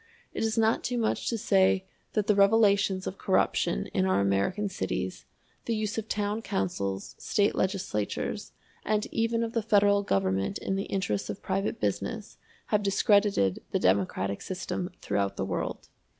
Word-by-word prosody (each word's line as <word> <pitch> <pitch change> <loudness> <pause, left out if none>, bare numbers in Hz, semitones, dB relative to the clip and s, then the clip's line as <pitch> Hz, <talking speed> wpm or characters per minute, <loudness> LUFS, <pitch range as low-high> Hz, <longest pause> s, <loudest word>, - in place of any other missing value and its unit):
It - - -2
is 225 0 0
not 225 0 +3
too 245 - -1
much 225 -2 0
to 230 - -1
say 190 -2 +3 0.3
that 210 -2 +1
the 210 - +4
revelations 200 -2 +4
of 190 - -5
corruption 65 - +1
in 95 - +2
our 95 +1 +2
American 100 - +1
cities, 95 - -3 0.4
the 230 - 0
use 215 -1 -2
of 220 - -7
town 210 +1 -1
councils, 95 - -2
State 205 0 +1
legislatures, 185 - -2 0.3
and 215 0 0
even 230 0 +1
of 230 0 -3
the 230 - +1
Federal 205 -2 +4
Government 95 - 0
in 195 - -2
the 195 - -2
interests 185 - -2
of 100 - -6
private 195 +4 -1
business, - - -3 0.3
have 210 - +4
discredited 200 - +3
the - - 0
democratic 95 +1 +1
system 185 -1 -4
throughout 100 -1 -1
the 95 - -1
world. 95 - -3
195 Hz, 160 wpm, -28 LUFS, -, 0.4 s, the